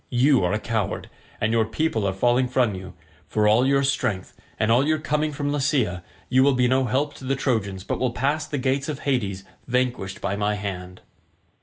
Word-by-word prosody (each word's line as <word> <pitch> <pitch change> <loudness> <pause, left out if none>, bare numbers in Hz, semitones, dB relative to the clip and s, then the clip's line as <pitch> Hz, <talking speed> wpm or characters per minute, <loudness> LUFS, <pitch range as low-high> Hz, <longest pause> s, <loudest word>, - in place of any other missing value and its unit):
You 130 -2 +3
are 90 - +1
a 105 - +1
coward, 110 -2 -3 0.3
and 110 - +1
your 115 -1 +3
people 110 -2 -1
are - - +1
falling 120 +6 +2
from 125 -3 +1
you. 95 -1 -8 0.3
For 105 -1 +1
all 115 +5 +4
your 140 0 +3
strength, 110 -8 -1 0.3
and 110 +1 +2
all 120 +4 +5
your 155 0 +2
coming 150 0 -1
from 145 0 -2
Lycia, 130 -11 0 0.2
you 130 0 +3
will 140 0 +4
be 125 0 +3
no 130 +1 +2
help 135 +5 0
to - - -12
the 135 +1 0
Trojans 100 -8 -1
but - - -3
will 130 - +1
pass 145 +5 -1
the 150 - -3
gates 135 +2 0
of 145 -2 -4
Hades 100 -9 -1 0.2
vanquished 120 -5 -1
by 100 - -2
my 105 +1 0
hand." 90 -3 -6
125 Hz, 205 wpm, -24 LUFS, 105-135 Hz, 0.3 s, all